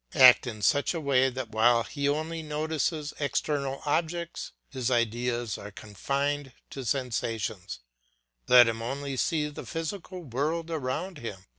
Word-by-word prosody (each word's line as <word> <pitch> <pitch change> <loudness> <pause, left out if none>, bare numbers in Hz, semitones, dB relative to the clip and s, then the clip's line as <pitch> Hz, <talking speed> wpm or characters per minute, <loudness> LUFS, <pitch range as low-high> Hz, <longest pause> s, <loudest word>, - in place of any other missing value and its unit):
Act 130 -2 +8
in 110 -3 -6
such 145 - +3
a - - -1
way 135 -3 +3
that 130 -3 -5
while 115 +2 +4
he 140 +2 -1
only 160 +3 -2
notices 155 0 -2
external 140 -1 -1
objects 170 +3 -1 0.2
his 130 -3 -2
ideas 120 -1 0
are 105 - -8
confined 140 +7 -2 0.2
to 135 - -6
sensations; 110 - -2 0.7
let 125 -1 +8
him 115 0 -2
only 135 +3 -3
see 150 +2 +1
the 150 - -8
physical 175 +2 -5
world 155 +5 -2
around 155 +4 -3
him. 100 -5 -7
135 Hz, 140 wpm, -28 LUFS, 120-155 Hz, 0.7 s, Act